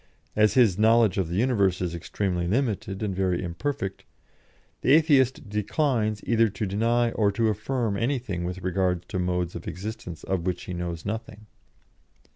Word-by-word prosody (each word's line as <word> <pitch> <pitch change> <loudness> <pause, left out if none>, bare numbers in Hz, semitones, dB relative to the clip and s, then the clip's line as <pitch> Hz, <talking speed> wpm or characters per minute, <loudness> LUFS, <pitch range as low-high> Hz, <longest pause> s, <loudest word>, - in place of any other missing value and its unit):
As 105 0 +4
his 110 -7 +4
knowledge 110 -3 +4
of 90 -4 -1
the 85 - -3
universe 100 -5 +2
is 90 -2 -2
extremely 90 +1 -2
limited 105 -2 -1
and 100 -3 -2
very 95 -1 0
imperfect, 95 +3 -3 0.8
the 130 - +4
Atheist 140 -7 +4
declines 105 0 0
either 115 -1 +3
to 100 +2 -3
deny 115 +4 +1
or 105 -3 +2
to 110 +2 +2
affirm 110 +1 -1
anything 115 -7 -1
with 90 +1 -5
regard 90 -1 0
to 95 - -2
modes 90 -1 -1
of - - -8
existence 90 -2 -6
of 95 -2 -2
which 90 - -2
he 90 - -6
knows 85 -2 -4
nothing. 110 0 -5
100 Hz, 160 wpm, -26 LUFS, 90-115 Hz, 0.8 s, As